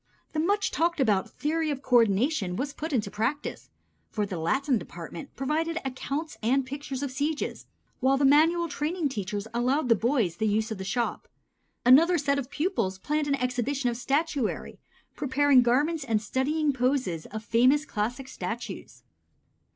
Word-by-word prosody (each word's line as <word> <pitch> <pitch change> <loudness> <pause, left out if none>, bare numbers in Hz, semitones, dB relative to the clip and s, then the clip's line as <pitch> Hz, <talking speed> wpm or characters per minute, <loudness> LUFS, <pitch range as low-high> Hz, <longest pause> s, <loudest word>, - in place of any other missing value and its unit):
The 310 - -1
much 400 +6 +1
talked 340 0 0
of 210 -8 +2
theory 315 +1 -1
of 280 -2 -3
co 250 -1 +4
ordination 215 - +2
was 280 +7 -3
put 320 +2 -5
into 210 -7 0
practice, 245 +8 -3 0.4
for 210 -2 -1
the 190 -4 -5
Latin 260 - +1
department 170 -2 -9
provided 315 +5 -1
accounts 280 +4 -4
and 260 +4 +2
pictures 280 0 -5
of 280 - -3
sieges, 290 +4 -3 0.3
while 270 +1 +3
the 280 - +2
manual 325 +5 +4
training 310 +1 -1
teachers 205 -3 -4
allowed 250 +3 +1
the 230 - +6
boys 225 - 0
the 220 - 0
use 215 +2 0
of 215 - -4
the - - -4
shop. 235 +5 -2 0.6
Another 325 +8 +7
set 280 -2 +1
of 260 -2 -5
pupils 290 - -1
planned 300 +9 -1
an 280 - +2
exhibition 250 0 -1
of - - -4
statuary, 275 0 -1 0.4
preparing 280 -1 +4
garments 290 +6 +1
and 225 -5 +1
studying 285 +6 0
poses 250 - 0
of 220 +1 -7
famous 255 +7 +4
classic 245 +1 -3
statues. 240 -2 -6
265 Hz, 160 wpm, -27 LUFS, 230-295 Hz, 0.6 s, Another